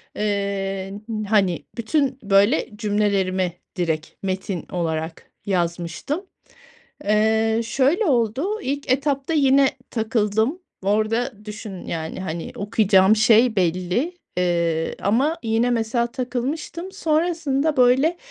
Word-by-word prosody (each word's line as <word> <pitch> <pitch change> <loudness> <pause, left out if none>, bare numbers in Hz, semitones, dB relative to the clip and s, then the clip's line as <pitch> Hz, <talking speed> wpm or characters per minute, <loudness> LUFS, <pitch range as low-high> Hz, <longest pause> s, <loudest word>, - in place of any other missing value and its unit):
eee, 200 -2 -2
n 215 -2 -3
hani, 195 -5 +2
bütün, 265 +3 0
böyle, 200 +7 +3
cümlelerimi 200 -4 0 0.2
direkt 160 -4 -1 0.2
metin 190 -2 -3
olarak 160 -2 -3
yazmıştım. 175 - -2 0.8
Eee, 220 +2 +2
şöyle 275 - +2
oldu, 275 - +1
ilk 280 0 -3
etapta 275 +2 0
yine 275 -2 +5 0.2
takıldım. 220 - 0 0.2
Orada 215 +3 0
düşün, 210 -3 -8
yani, 160 +1 -4
hani, 170 -2 -5
okuyacağım 200 -1 +4
şey 220 +1 +5
belli, 185 - 0 0.2
eee, 170 -2 0
ama 265 +11 +2
yine 225 +2 +1
mesela 235 0 +1
takılmıştım. 275 +8 -4
Sonrasında, 315 -4 0
böyle, 260 +7 +4
220 Hz, 100 wpm, -22 LUFS, 195-265 Hz, 0.8 s, yine